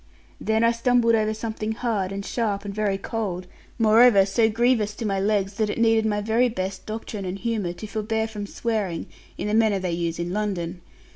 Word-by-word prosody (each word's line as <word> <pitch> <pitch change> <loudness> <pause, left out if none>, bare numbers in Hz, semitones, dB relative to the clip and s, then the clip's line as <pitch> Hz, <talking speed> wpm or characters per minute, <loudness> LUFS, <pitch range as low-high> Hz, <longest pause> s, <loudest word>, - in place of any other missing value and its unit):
Then 220 +1 +1
I 230 - +5
stumbled 235 0 +3
over 215 -1 +2
something 220 0 -3
hard, 220 -5 -1
and 200 0 -5
sharp, 210 -4 -1
and 200 - -4
very 205 -2 0
cold, 195 -4 -3 0.3
moreover 220 -2 +6
so 220 +3 +2
grievous 225 -2 +1
to 230 - -5
my 195 -2 0
legs 200 0 +1
that 215 -1 +1
it - - -3
needed 225 -1 +3
my 210 -1 0
very 225 +4 +2
best 190 -3 -4
doctrine 215 -1 -5
and 185 +1 -4
humour 210 -5 -2
to 215 - -8
forbear 220 +1 -1
from 210 -2 -6
swearing, 205 -7 -2 0.3
in - - -3
the 210 - -1
manner 220 -2 +3
they 185 -2 -2
use 170 -1 -2
in 170 +1 -3
London. 185 -4 -2
215 Hz, 200 wpm, -24 LUFS, 195-225 Hz, 0.3 s, moreover